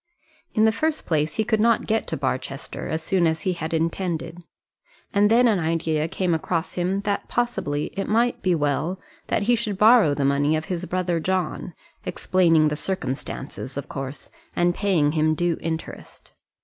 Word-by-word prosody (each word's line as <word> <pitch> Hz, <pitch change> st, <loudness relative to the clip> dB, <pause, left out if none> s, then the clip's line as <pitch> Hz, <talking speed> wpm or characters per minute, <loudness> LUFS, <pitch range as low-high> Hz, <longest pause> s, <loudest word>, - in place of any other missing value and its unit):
In 215 Hz, -1 st, +4 dB
the 220 Hz, -, +5 dB
first 310 Hz, +7 st, -1 dB
place 155 Hz, -1 st, 0 dB
he 220 Hz, -, +1 dB
could 220 Hz, 0 st, +1 dB
not 230 Hz, 0 st, +3 dB
get 220 Hz, +1 st, 0 dB
to -, -, -3 dB
Barchester -, -, -3 dB
as 160 Hz, 0 st, -2 dB
soon 180 Hz, -1 st, +2 dB
as 160 Hz, 0 st, -1 dB
he 185 Hz, -, 0 dB
had 160 Hz, -2 st, -4 dB
intended, 165 Hz, +1 st, -2 dB, 0.7 s
and 205 Hz, 0 st, +4 dB
then 240 Hz, +2 st, +5 dB
an 210 Hz, -5 st, +3 dB
idea 160 Hz, -1 st, 0 dB
came 180 Hz, +1 st, 0 dB
across 165 Hz, +1 st, -1 dB
him 185 Hz, +2 st, -1 dB
that 200 Hz, 0 st, -2 dB
possibly 195 Hz, -12 st, -1 dB
it 195 Hz, -, -2 dB
might 235 Hz, +3 st, +2 dB
be 180 Hz, -2 st, +2 dB
well 155 Hz, +5 st, -1 dB, 0.3 s
that -, -, 0 dB
he 240 Hz, +4 st, +3 dB
should 215 Hz, -4 st, -1 dB
borrow 215 Hz, -8 st, +6 dB
the 140 Hz, -, 0 dB
money 140 Hz, +2 st, +2 dB
of 155 Hz, 0 st, -2 dB
his 180 Hz, -1 st, -3 dB
brother 180 Hz, -2 st, -1 dB
John, 180 Hz, 0 st, -2 dB, 0.3 s
explaining 165 Hz, -4 st, +3 dB
the 150 Hz, -, -2 dB
circumstances, 140 Hz, -5 st, -4 dB
of 140 Hz, -, -5 dB
course, 135 Hz, 0 st, -6 dB, 0.2 s
and 175 Hz, 0 st, +2 dB
paying 175 Hz, -7 st, +2 dB
him 155 Hz, 0 st, +2 dB
due 175 Hz, 0 st, 0 dB
interest. 160 Hz, 0 st, -6 dB
175 Hz, 175 wpm, -24 LUFS, 155-200 Hz, 0.7 s, borrow